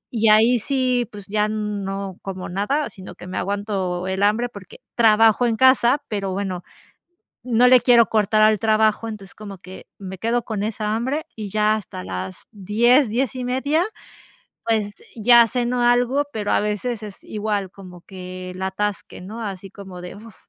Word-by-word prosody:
y 220 0 +3
ahí 225 +3 +5
sí, 255 -2 0
pues 205 -2 -10
ya 210 +1 +1
no 200 -3 -4
como 190 -1 -6
nada, 240 +11 -1
sino 190 -2 -11
que - - -11
me 185 - -5
aguanto 195 -2 -2
el 190 +1 -2
hambre, 220 +4 +2
porque 200 -4 -12 0.2
trabajo 225 +1 +4
en 230 - 0
casa, 260 +3 +4
pero 195 -3 -3
bueno, 185 -2 -3 0.8
no 245 0 +3
le 255 -1 +7
quiero 235 -1 +5
cortar 215 0 +1
al 215 -1 +4
trabajo. 220 0 +2
Entonces 205 -3 -9
como 200 -3 -9
que 185 +1 -12
me 190 -1 -7
quedo 235 +3 0
con 210 -3 -3
esa 215 0 -2
hambre, 260 +7 -1
y 215 -2 -6
ya 215 +1 +2
hasta 180 - -6
las 95 0 -6
10, 230 +7 +3
10:30, 260 +6 0 0.8
pues, 215 -2 0 0.2
ya 235 +1 +6
ceno 245 +1 -1
algo, 245 +4 +3
pero 210 -2 -2
a - - +3
veces 210 +2 -3
es 205 -2 -10
igual, 210 -3 -3
como 180 -3 -13
que 185 -1 -9
el 185 - -9
atasque, 200 +1 -3
¿no? 215 +5 -8
Así 195 -2 -6
como 190 -3 -10
de, 180 - -8
uf, 215 0 -13
215 Hz, 170 wpm, -22 LUFS, 195-235 Hz, 0.8 s, le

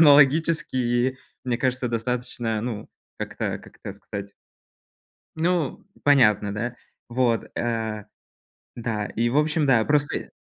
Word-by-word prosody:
хронологически 135 -4 +4 0.3
мне 120 -2 0
кажется, 130 0 0
достаточно, 120 -1 -2
ну, 110 -3 -4 0.3
как-то, - - -3
как - - -16
это 100 - -4
сказать 100 0 -7 1.0
Ну, 165 -3 0 0.2
понятно, 105 -8 +4
да? 120 +3 -3 0.3
Вот. 120 -1 +1
Э, 110 -3 -2 0.7
да. 110 -3 -2
И 120 +1 0
в 125 - 0
общем, 150 0 +2
да, 120 -5 +5
простые 145 -1 0
120 Hz, 115 wpm, -25 LUFS, 110-140 Hz, 1.0 s, да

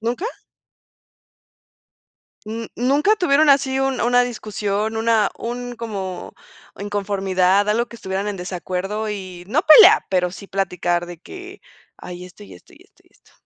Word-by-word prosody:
¿Nunca? 235 - -3 2.2
Mm, 225 +2 -5
¿nunca 285 - +2
tuvieron 310 -5 +3
así 275 -1 +3
un 270 -1 -1
una 245 +1 +3
discusión, 215 -2 -3
una 225 -2 +2
un 245 +1 -5
como 200 -5 -6 0.4
inconformidad, 195 -1 0
algo 230 +3 +1
que 235 - -12
estuvieran 195 -1 -4
en 205 - -4
desacuerdo? 185 +4 -4
y 185 -4 -7
no 270 - +1
pelea, 380 +6 +8
pero 180 -2 +1
sí 195 +3 -11
platicar 175 -3 -1
de 175 -1 -10
que 380 - -11 0.4
ay, 180 0 -9
esto, 180 -9 -14
y 100 -2 -13
esto, 90 - -19
y - - -19
esto, - - -30
y - - -28
esto. - - -28
210 Hz, 145 wpm, -20 LUFS, 185-245 Hz, 2.2 s, pelea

